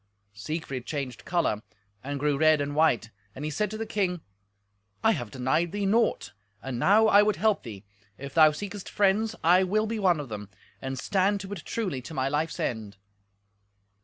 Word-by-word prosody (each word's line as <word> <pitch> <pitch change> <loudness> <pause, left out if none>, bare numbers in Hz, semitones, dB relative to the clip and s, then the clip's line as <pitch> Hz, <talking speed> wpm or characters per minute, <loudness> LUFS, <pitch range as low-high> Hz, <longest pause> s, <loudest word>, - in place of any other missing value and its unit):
Siegfried 135 +3 -5
changed 135 -5 -5
colour, 170 -12 0 0.4
and 140 +1 -4
grew 145 0 +1
red 155 +1 +4
and 145 0 -3
white, 150 -8 +2 0.2
and 140 - -5
he 155 - -2
said 210 +7 -1
to 215 - -6
the 225 - -3
king, 185 -5 -1 0.8
"I 220 - +5
have 120 - -3
denied 130 - 0
thee 205 -1 -1
naught, 195 - +1 0.3
and 130 -3 -4
now 210 - +5
I 205 -1 +6
would 210 -1 +2
help 215 +3 +1
thee. 105 -5 -9 0.3
If 140 0 -8
thou 155 -1 +7
seekest 200 +5 -7
friends, 210 +3 +1
I 180 +3 +5
will 215 +4 +1
be 220 0 -3
one 180 -5 +3
of 145 -4 -6
them, 105 -2 -7 0.3
and 130 0 -4
stand 200 +4 +1
to 195 0 -8
it 175 - -7
truly 185 - -3
to 155 +6 -9
my 130 0 0
life's 150 +3 -1
end." 110 -3 -3
160 Hz, 190 wpm, -27 LUFS, 130-200 Hz, 0.8 s, thou